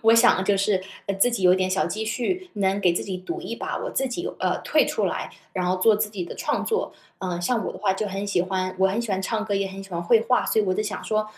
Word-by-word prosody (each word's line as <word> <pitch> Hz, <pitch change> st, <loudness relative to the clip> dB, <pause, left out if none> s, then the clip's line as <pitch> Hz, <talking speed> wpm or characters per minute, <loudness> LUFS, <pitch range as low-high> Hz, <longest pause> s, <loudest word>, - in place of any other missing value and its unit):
我 225 Hz, 0 st, +5 dB
想 230 Hz, -5 st, +5 dB
就 200 Hz, 0 st, +3 dB
是， 195 Hz, -1 st, +1 dB, 0.2 s
呃， 200 Hz, -, 0 dB
自 195 Hz, +6 st, +3 dB
己 230 Hz, -5 st, -2 dB
有 180 Hz, 0 st, +7 dB
点 185 Hz, 0 st, +1 dB
小 190 Hz, +1 st, +1 dB
积 220 Hz, +2 st, -3 dB
蓄， 360 Hz, +12 st, -2 dB
能 195 Hz, 0 st, +1 dB
给 180 Hz, -3 st, +4 dB
自 -, -, -2 dB
己 190 Hz, -2 st, -3 dB
赌 345 Hz, -, -5 dB
一 -, -, -5 dB
把 -, -, -4 dB
我 -, -, -4 dB
自 270 Hz, -1 st, 0 dB
己 345 Hz, +9 st, -3 dB
呃， -, -, +1 dB
退 -, -, +3 dB
出 -, -, -1 dB
来， -, -, -2 dB, 0.2 s
然 185 Hz, -, -1 dB
后 180 Hz, +1 st, +1 dB
做 210 Hz, +4 st, +5 dB
自 210 Hz, 0 st, 0 dB
己 190 Hz, -5 st, -4 dB
的 -, -, -8 dB
创 -, -, -1 dB
作。 450 Hz, 0 st, -1 dB, 0.3 s
呃， 180 Hz, -2 st, -3 dB
像 225 Hz, +5 st, 0 dB
我 -, -, -3 dB
的 -, -, -9 dB
话 195 Hz, -1 st, +2 dB
就 205 Hz, +2 st, -2 dB
很 195 Hz, +1 st, -3 dB
喜 195 Hz, -3 st, +1 dB
欢 185 Hz, 0 st, -2 dB
我 190 Hz, -, +5 dB
很 200 Hz, +4 st, 0 dB
喜 235 Hz, -, -3 dB
欢 190 Hz, 0 st, -1 dB
唱 215 Hz, +1 st, -1 dB
歌， 205 Hz, -2 st, -1 dB
也 195 Hz, 0 st, 0 dB
很 195 Hz, 0 st, -8 dB
喜 195 Hz, 0 st, -11 dB
欢 170 Hz, 0 st, -3 dB
绘 220 Hz, +6 st, +5 dB
画， 250 Hz, +1 st, +2 dB
所 220 Hz, -, +2 dB
以 -, -, +1 dB
我 185 Hz, -1 st, +1 dB
就 215 Hz, -, 0 dB
想 215 Hz, -, -4 dB
说， 215 Hz, -1 st, +1 dB
200 Hz, 320 characters per minute, -24 LUFS, 185-225 Hz, 0.3 s, 有